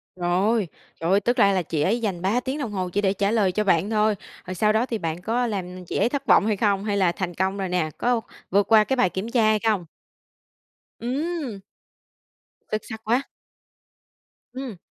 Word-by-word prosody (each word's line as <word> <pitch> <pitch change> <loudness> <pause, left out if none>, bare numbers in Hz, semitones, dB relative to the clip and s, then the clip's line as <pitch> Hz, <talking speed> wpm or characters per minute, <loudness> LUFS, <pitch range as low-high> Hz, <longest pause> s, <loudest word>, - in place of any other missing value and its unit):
Rồi, 185 +4 +1 0.3
trời 165 +2 0
ơi, 195 - +5
tức 245 +5 0
ra 200 -4 +5
là 185 - +2
chị 160 -3 -2
ấy 220 +9 +2
dành 190 -6 -2
3 205 +6 +1
tiếng 265 +3 -3
đồng 245 -8 -3
hồ 185 -2 -2
chỉ 200 +3 0
để 195 -1 +2
trả 200 +1 0
lời 210 -5 +2
cho 210 +4 0
bạn 190 +1 +2
thôi, 215 -1 +2 0.3
rồi 185 0 -5
sau 210 +3 +2
đó 225 +3 +2
thì 235 - -3
bạn 165 -2 -4
có 240 +5 0
làm 185 -4 -5
chị - - -3
ấy 235 - +3
thất 285 0 -3
vọng - - +5
hay 215 -2 +1
không, 200 -2 +1
hay 205 -1 0
là 185 -3 +3
thành 175 0 -4
công 190 +3 -1
rồi 190 -2 -2
nè? 180 -3 0
Có 245 -1 +1 0.3
vượt 200 +1 +3
qua 220 -1 +8
cái 265 +5 0
bài 245 -7 +3
kiểm 190 +6 -4
tra 240 -3 +3
hay 215 0 +3
không? 210 -6 0 1.2
Ừm! 270 - -3 1.1
Xuất 215 - 0
sắc 220 -2 -7
quá. 245 +5 +1 1.3
Ừm. 255 -7 -6
205 Hz, 215 wpm, -24 LUFS, 185-230 Hz, 1.3 s, qua